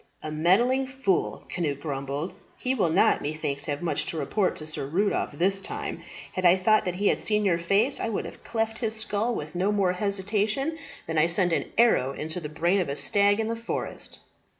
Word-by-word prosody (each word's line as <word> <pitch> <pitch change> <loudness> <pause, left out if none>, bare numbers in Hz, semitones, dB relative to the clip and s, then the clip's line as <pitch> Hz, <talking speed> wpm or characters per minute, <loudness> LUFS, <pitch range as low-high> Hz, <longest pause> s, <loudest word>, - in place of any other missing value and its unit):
"A 155 - -4
meddling 230 +12 +3
fool," 260 -8 -1
Cnut 150 -6 -1
grumbled. 140 +2 -4 0.2
"He 255 - -1
will 200 -10 +1
not, 160 - +4
methinks, 145 -2 -2
have 145 +2 -3
much 170 - -1
to 165 - -3
report 185 +7 0
to 155 - -7
Sir 155 -3 -4
Rudolph 190 +2 0
this 195 +6 +1
time. - - -5 0.3
Had 185 - -3
I 180 +1 +6
thought 215 +4 +3
that 180 -1 -2
he 200 +2 +2
had - - +1
seen 210 -1 +1
your 170 -3 +2
face, 200 +10 +2
I - - -1
would 215 - -2
have - - -10
cleft 225 -1 -2
his 220 -2 -1
skull 220 +2 -1
with 150 0 -5
no 185 +3 +1
more 195 -3 +2
hesitation 205 - 0 0.3
than 160 -1 0
I 160 - +5
send 175 0 +2
an - - 0
arrow 140 - +4
into 155 +5 -2
the 150 -3 -6
brain 170 +5 +1
of 180 - -1
a 140 - -2
stag 205 +5 +3
in 220 - 0
the 230 - -1
forest." 230 0 -4
190 Hz, 210 wpm, -26 LUFS, 155-215 Hz, 0.3 s, I